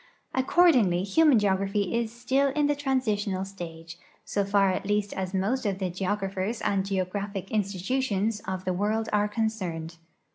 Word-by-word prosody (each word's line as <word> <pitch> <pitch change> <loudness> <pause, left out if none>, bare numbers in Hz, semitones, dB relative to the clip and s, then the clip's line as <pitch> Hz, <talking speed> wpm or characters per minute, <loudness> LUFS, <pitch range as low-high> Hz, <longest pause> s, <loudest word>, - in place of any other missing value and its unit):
Accord 340 +7 +5
ingly 185 -7 +2
human 295 +5 +5
geogra|)hy 195 0 +1
is 235 -1 0
still 260 +4 +1
in 295 0 +2
the 290 - +3
transitional 215 -9 -1
stage, 170 -3 -9 0.3
so 200 - 0
far 200 -1 +3
at 185 - -3
least 205 0 0
as 190 -1 -3
most 200 +7 0
of 200 -3 -1
the 190 -2 -2
geographers 195 +3 -2
and 195 -1 +1
geographic 195 0 -3
institutions 210 +1 0
of 185 -1 -4
the 185 - 0
world 215 +4 0
are 210 0 +3
concerned. 185 -7 -3
200 Hz, 155 wpm, -27 LUFS, 190-225 Hz, 0.3 s, Accord